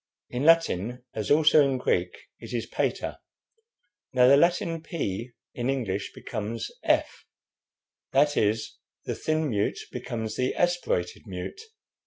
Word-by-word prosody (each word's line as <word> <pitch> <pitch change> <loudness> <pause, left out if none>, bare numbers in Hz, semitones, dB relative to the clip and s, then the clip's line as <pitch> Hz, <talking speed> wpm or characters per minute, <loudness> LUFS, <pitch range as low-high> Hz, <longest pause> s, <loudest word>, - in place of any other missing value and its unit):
In 125 +3 -2
Latin, 125 - +3
as 110 -2 -3
also 155 0 +6
in 135 -2 +1
Greek, 90 -7 0 0.2
it - - -9
is 120 - -1
'pater.' - - -2 0.9
Now 125 -1 +5
the 135 - +8
Latin 170 +1 +2
'p' 120 - -4 0.2
in 120 +1 -2
English 105 -8 -2
becomes 110 0 -4
'f;' - - +1 0.8
that 145 +2 +3
is, 110 +1 0 0.3
the - - -2
thin 155 0 0
mute 100 -2 0
becomes 110 -2 -4
the 130 0 0
aspirated 175 - 0
mute. 90 - -6
125 Hz, 130 wpm, -27 LUFS, 110-155 Hz, 0.9 s, the